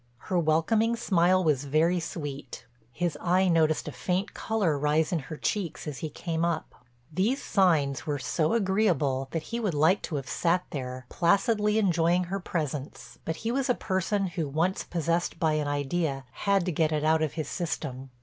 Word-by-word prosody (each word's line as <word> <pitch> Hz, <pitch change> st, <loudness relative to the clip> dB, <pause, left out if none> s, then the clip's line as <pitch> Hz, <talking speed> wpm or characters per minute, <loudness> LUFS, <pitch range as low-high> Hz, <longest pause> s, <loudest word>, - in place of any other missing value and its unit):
Her 180 Hz, +8 st, -1 dB
welcoming 195 Hz, +9 st, +2 dB
smile 185 Hz, -4 st, +3 dB
was 145 Hz, -4 st, +1 dB
very 160 Hz, +5 st, +2 dB
sweet; 145 Hz, -5 st, -6 dB, 0.3 s
his 175 Hz, +6 st, -2 dB
eye 185 Hz, +2 st, +3 dB
noticed 160 Hz, -3 st, +2 dB
a -, -, -3 dB
faint 180 Hz, +9 st, -2 dB
color 205 Hz, -9 st, 0 dB
rise 150 Hz, +2 st, +1 dB
in 175 Hz, -, +1 dB
her 155 Hz, -, -5 dB
cheeks 185 Hz, -4 st, -2 dB
as 145 Hz, -3 st, -5 dB
he 155 Hz, -, -4 dB
came 165 Hz, +2 st, -3 dB
up. 170 Hz, -2 st, -1 dB, 0.4 s
These 215 Hz, -, +1 dB
signs 160 Hz, -8 st, +2 dB
were 145 Hz, -1 st, 0 dB
so 155 Hz, +5 st, 0 dB
agreeable 185 Hz, -, +1 dB
that 165 Hz, +1 st, -3 dB
he 235 Hz, -, 0 dB
would 205 Hz, -8 st, -1 dB
like 160 Hz, +7 st, +4 dB
to 160 Hz, -, -4 dB
have 135 Hz, -2 st, -4 dB
sat 180 Hz, +4 st, +1 dB
there, 130 Hz, -2 st, -5 dB
placidly 210 Hz, +4 st, +2 dB
enjoying 175 Hz, -3 st, +3 dB
her 190 Hz, +3 st, -3 dB
presence, 150 Hz, -6 st, -5 dB
but 160 Hz, -, -2 dB
he 230 Hz, -, +1 dB
was 270 Hz, +1 st, 0 dB
a 250 Hz, -, +4 dB
person 195 Hz, +1 st, 0 dB
who 165 Hz, -4 st, -3 dB
once 165 Hz, +7 st, 0 dB
possessed 170 Hz, 0 st, -1 dB
by 160 Hz, -2 st, +2 dB
an 150 Hz, -1 st, 0 dB
idea 145 Hz, -1 st, -1 dB
"had 200 Hz, +1 st, +1 dB
to 180 Hz, -, 0 dB
get 160 Hz, 0 st, +1 dB
it 150 Hz, -1 st, 0 dB
out 160 Hz, +1 st, +3 dB
of 155 Hz, -3 st, 0 dB
his 155 Hz, -3 st, -3 dB
system." 140 Hz, -7 st, -4 dB
165 Hz, 185 wpm, -28 LUFS, 150-185 Hz, 0.4 s, like